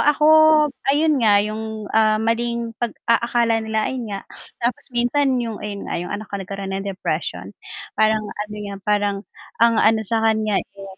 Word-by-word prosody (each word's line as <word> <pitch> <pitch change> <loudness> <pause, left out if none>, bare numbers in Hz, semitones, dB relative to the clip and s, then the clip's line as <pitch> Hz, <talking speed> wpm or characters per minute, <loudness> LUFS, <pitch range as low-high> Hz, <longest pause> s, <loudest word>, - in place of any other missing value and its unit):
ako 295 0 +3 0.6
ayun 295 0 +3
nga 210 -3 +5
yung, 220 0 -5
ah, 215 -1 +4
maling 235 +1 -1
pag-aakala 235 0 +1
nila 220 0 -2
ayun 255 -3 -4
nga. 200 -1 -4 0.4
Tapos 255 +4 -1
minsan 255 +3 +1
yung 225 -2 -5
ayun 205 -1 -6
nga - - -2
yung 175 - -5
anak 210 0 -6
ko - - -1
nagkaroon 195 0 -6
ng 195 +1 -3
depression, 190 -1 -4 0.4
parang 215 0 +2
ano 210 0 -6
nga 200 -1 -6
parang 205 -1 +1 0.4
ang 230 -1 +5
ano 220 0 +4
sa 225 +2 +1
kanya 215 -2 +1 0.2
eh 195 - -9
220 Hz, 165 wpm, -21 LUFS, 210-235 Hz, 0.6 s, nga